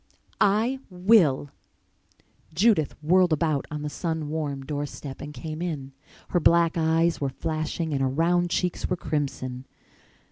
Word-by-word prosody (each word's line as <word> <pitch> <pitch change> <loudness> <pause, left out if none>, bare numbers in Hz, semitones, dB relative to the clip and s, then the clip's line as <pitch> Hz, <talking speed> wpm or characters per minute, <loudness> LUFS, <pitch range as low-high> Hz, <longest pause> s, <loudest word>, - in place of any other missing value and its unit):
"I 220 +6 +2
will!" 180 -8 +3 1.0
Judith 190 -5 +3
whirled 180 +2 +4
about 155 -2 +1
on 150 -1 -5
the - - -2
sun 160 -1 -3
warm 145 -3 -3
door 145 0 -3
step 135 -1 -9
and 145 - -6
came 155 +1 -6
in. 145 -6 -4 0.4
Her 175 - +2
black 170 0 +4
eyes 165 0 +2
were 140 - 0
flashing 155 +2 -3
and 135 - 0
her 135 - +2
round 175 +5 +2
cheeks 180 0 -1
were 180 - 0
crimson. 135 -5 -3
160 Hz, 145 wpm, -26 LUFS, 145-175 Hz, 1.0 s, whirled